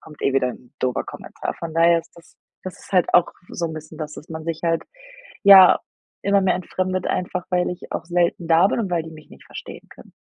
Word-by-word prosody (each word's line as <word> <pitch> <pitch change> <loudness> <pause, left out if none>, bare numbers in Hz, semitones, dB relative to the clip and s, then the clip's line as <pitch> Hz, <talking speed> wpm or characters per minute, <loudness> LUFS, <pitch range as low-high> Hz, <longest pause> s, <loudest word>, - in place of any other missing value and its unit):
kommt 150 -2 -14
eh 135 - +1
wieder 125 -2 +2
'n 125 0 -14
doofer 130 -1 -1
Kommentar.“ - - -7
Von 165 -1 -7
daher 170 0 +4
ist - - -24
das 170 -1 -19 0.3
das 185 - -7
ist - - -16
halt 180 -3 +2
auch 175 - +5 0.2
so 170 - -3
'n 160 - -6
bisschen, 155 0 -10
das, 150 -1 -6
dass 155 - -12
man 160 0 -7
sich 165 -1 -4
halt, 165 0 +1 0.6
ja, 195 -2 +9 0.4
immer 200 0 +3
mehr 190 -1 +2
entfremdet, 185 +1 -3
einfach, 180 0 -3
weil 180 -1 +1
ich 180 - -9
auch - - -4
selten 175 -1 0
da 170 +4 +5
bin - - -1
und 195 -4 -3
weil 170 -2 0
die 160 - -9
mich 155 -1 -14
nicht - - -16
verstehen - - -10
können. - - -16
170 Hz, 235 wpm, -22 LUFS, 160-180 Hz, 0.6 s, ja